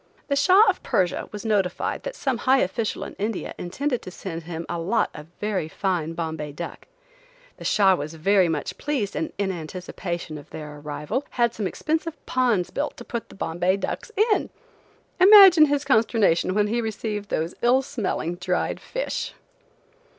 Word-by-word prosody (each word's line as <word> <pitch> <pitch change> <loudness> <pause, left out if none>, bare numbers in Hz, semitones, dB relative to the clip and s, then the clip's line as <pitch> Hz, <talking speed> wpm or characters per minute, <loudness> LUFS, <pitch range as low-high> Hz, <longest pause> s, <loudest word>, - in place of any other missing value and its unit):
The 280 - +2
Shah 370 +10 +6
of 390 - +1
Persia 180 -2 0
was 210 +1 -7
notified 200 -4 0
that - - -6
some 260 -4 -1
high 265 +1 +4
official 215 +3 -1
in - - -7
India 210 0 -3
intended 250 +8 -2
to - - -8
send 175 -2 -6
him 165 -1 -5
a 170 - -3
lot 190 +8 +1
of 150 +1 -10
very 205 -6 -1
fine 165 -2 -2
Bombay 160 -3 -4
duck. 170 +3 -7 0.7
The - - -10
Shah 195 -3 +4
was 155 -2 -4
very 185 +2 +3
much 155 -3 -3
pleased 270 -9 -2
and, 320 - -2
in 200 -1 0
anticipation 170 -1 -5
of 145 - -15
their 150 -1 -8
arrival, 150 - -4
had 235 -1 +1
some 210 -4 -2
expensive 320 - -2
ponds 240 -8 +1
built 295 +1 -3
to 240 - -10
put 235 -1 -5
the - - -13
Bombay 180 +1 0
ducks 200 - -4 0.2
in! - - -1 0.7
Imagine 375 -5 +9
his 290 0 0
consternation 220 - +3
when 210 0 +3
he 230 +3 0
received 215 -2 -4
those 165 +3 -1
ill 250 +3 +4
smelling, 210 - -3
dried 180 0 -1
fish! - - -4
200 Hz, 170 wpm, -24 LUFS, 170-255 Hz, 0.7 s, Imagine